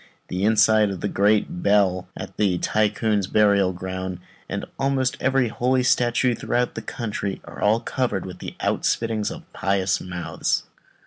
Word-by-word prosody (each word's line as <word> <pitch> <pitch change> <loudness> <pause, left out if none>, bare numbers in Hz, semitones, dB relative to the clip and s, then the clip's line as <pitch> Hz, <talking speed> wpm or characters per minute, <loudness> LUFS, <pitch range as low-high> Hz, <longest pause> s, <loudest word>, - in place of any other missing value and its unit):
The 90 +1 -2
inside 110 0 +4
of 95 -3 -5
the - - 0
great 100 -3 +1
bell 95 -3 +2
at - - -7
the 95 -4 +2
Tycoon's 105 0 +1
burial 100 -3 +3
ground, 95 0 -5 0.3
and - - -3
almost 135 -1 +1
every 130 -2 +2
holy 125 +3 +1
statue 125 0 +2
throughout 120 +2 -1
the - - -5
country, 105 -4 -4
are - - -10
all 105 +2 +3
covered 120 -6 -2
with 90 -1 -8
these - - -7
outspittings 110 -2 0
from - - -6
pious 95 0 0
mouths. 90 -3 -2
105 Hz, 150 wpm, -23 LUFS, 95-120 Hz, 0.3 s, inside